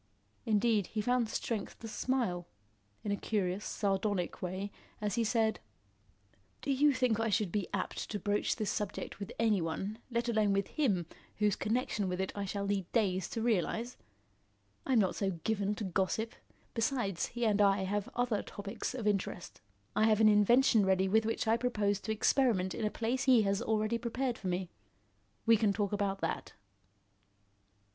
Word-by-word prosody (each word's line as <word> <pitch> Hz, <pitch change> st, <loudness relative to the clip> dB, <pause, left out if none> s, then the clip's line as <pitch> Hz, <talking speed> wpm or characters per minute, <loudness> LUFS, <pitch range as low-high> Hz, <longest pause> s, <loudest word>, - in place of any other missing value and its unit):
Indeed, 215 Hz, -2 st, +2 dB
he 220 Hz, -, -4 dB
found 245 Hz, +1 st, +1 dB
strength 220 Hz, -3 st, -3 dB
to 225 Hz, -, -8 dB
smile, 220 Hz, -8 st, -1 dB, 0.6 s
in 205 Hz, -, -2 dB
a -, -, +2 dB
curious, 200 Hz, -2 st, -1 dB
sardonic 195 Hz, -3 st, -1 dB
way, 185 Hz, +3 st, -3 dB, 0.3 s
as 210 Hz, -1 st, -1 dB
he 235 Hz, -, +1 dB
said: 220 Hz, -1 st, +1 dB, 1.0 s
"Do 280 Hz, -, 0 dB
you 290 Hz, +2 st, +4 dB
think 250 Hz, -5 st, +1 dB
I 225 Hz, 0 st, +1 dB
should 210 Hz, -3 st, +1 dB
be 200 Hz, -2 st, -1 dB
apt -, -, -3 dB
to 210 Hz, -, -2 dB
broach 205 Hz, 0 st, 0 dB
this 215 Hz, -3 st, -1 dB
subject 205 Hz, -1 st, -4 dB
with 200 Hz, +2 st, -6 dB
any 220 Hz, -5 st, +2 dB
one, 190 Hz, +7 st, -3 dB
let 235 Hz, 0 st, -1 dB
alone 215 Hz, -3 st, +2 dB
with 200 Hz, 0 st, 0 dB
him, 205 Hz, -, +1 dB, 0.3 s
whose 210 Hz, -2 st, +2 dB
connection 215 Hz, -4 st, -1 dB
with 180 Hz, 0 st, -2 dB
it 190 Hz, -, -1 dB
I 200 Hz, -1 st, -3 dB
shall 200 Hz, +1 st, -3 dB
need 195 Hz, -3 st, -1 dB
days 190 Hz, -6 st, +1 dB
to 225 Hz, -, -3 dB
realise? 230 Hz, +2 st, 0 dB, 0.9 s
I'm 260 Hz, -, +3 dB
not 195 Hz, -4 st, +3 dB
so 190 Hz, -4 st, -2 dB
given 205 Hz, -2 st, 0 dB
to 215 Hz, -, -5 dB
gossip. 195 Hz, +4 st, -1 dB, 0.4 s
Besides, 225 Hz, -6 st, 0 dB
he 240 Hz, 0 st, -2 dB
and 210 Hz, -1 st, +3 dB
I 200 Hz, -1 st, +4 dB
have 200 Hz, +1 st, -2 dB
other 245 Hz, -3 st, +1 dB
topics 205 Hz, +4 st, -5 dB
of 240 Hz, -4 st, -4 dB
interest. 195 Hz, -3 st, -2 dB, 0.3 s
I 215 Hz, -, +4 dB
have 215 Hz, -1 st, +4 dB
an 220 Hz, -1 st, +7 dB
invention 220 Hz, +2 st, +5 dB
ready 190 Hz, 0 st, +3 dB
with 220 Hz, +3 st, +3 dB
which 225 Hz, -, -1 dB
I 225 Hz, +1 st, +4 dB
propose 210 Hz, -5 st, 0 dB
to 220 Hz, -, -4 dB
experiment 215 Hz, -4 st, +2 dB
in 220 Hz, -, -2 dB
a -, -, +2 dB
place 235 Hz, +4 st, -1 dB
he 250 Hz, -4 st, +6 dB
has 200 Hz, 0 st, +1 dB
already 220 Hz, +1 st, 0 dB
prepared 240 Hz, +1 st, -2 dB
for 190 Hz, -, -5 dB
me. 180 Hz, 0 st, -2 dB, 0.7 s
We 230 Hz, 0 st, +6 dB
can 210 Hz, -1 st, +3 dB
talk 205 Hz, -1 st, -1 dB
about 200 Hz, -1 st, -1 dB
that." 165 Hz, -, -3 dB
210 Hz, 175 wpm, -32 LUFS, 195-230 Hz, 1.0 s, an